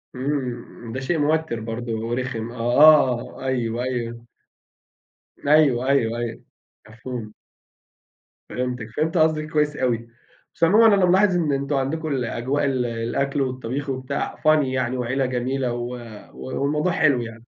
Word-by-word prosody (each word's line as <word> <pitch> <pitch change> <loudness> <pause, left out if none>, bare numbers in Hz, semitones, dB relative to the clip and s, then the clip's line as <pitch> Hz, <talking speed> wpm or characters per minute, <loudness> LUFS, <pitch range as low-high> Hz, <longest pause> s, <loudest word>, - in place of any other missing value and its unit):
امم، 130 -3 -4
ده 135 - -3
شيء 160 +6 -1
موتر 155 -4 0
برضو 115 0 -4
ورخم. 120 -2 -3
آه، 120 - -10 0.8
آه، - - -7
أيوه، 120 -2 -1
أيوه. 120 -2 -4 1.2
أيوه، 140 -4 +4
أيوه، 120 -4 +2
أيوه. 120 -1 -5 0.5
مفهوم. 110 -1 -7 1.2
فهمتِك. 125 -3 -3
فهمت 160 +3 0
قصدِك 155 -1 +2
كويس 150 -1 +1
أوي. 120 -4 -1 0.5
بس - - -4
عمومًا 210 +5 +6
أنا 195 -2 +3
ملاحظ 185 +1 +4
إن 160 -4 +1
أنتم 140 +1 -1
عندكم 140 0 -1
أجواء 130 +5 -1
ال 130 -3 0
الأكل 120 +5 -1
والطبيخ 130 +2 -3
وبتاع 130 +1 -3
funny 155 -1 +3
يعني 130 -1 -1
وعيلة 125 +2 0
جميلة 125 0 -1
و 120 0 -4 0.4
والموضوع 150 +6 -1
حلو 140 -7 +3
يعني. 115 -1 -8
130 Hz, 135 wpm, -23 LUFS, 120-150 Hz, 1.2 s, عمومًا